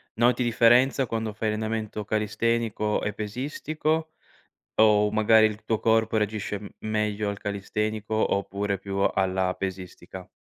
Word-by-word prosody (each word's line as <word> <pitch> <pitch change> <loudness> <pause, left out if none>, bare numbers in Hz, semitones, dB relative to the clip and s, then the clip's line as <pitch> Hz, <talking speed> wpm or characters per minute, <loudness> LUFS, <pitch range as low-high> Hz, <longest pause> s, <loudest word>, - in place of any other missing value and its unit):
Noti 120 +3 +3
differenza 120 +3 +4
quando 110 -2 -3
fai 110 +1 -2
allenamento 110 -1 -3
calistenico 110 0 0
e 105 - -1
pesistico, 155 +8 -2 0.7
o 105 -1 +5
magari 110 0 +5
il 105 0 -4
tuo 110 - 0
corpo 110 0 +2
reagisce 105 -1 -1
m 100 0 -9
meglio 105 -1 -1
al 100 - -6
calistenico 105 +2 -3
oppure 100 -1 0
più 100 0 -5
alla 95 -1 +1
pesistica? 95 -2 -7
110 Hz, 125 wpm, -26 LUFS, 105-115 Hz, 0.7 s, o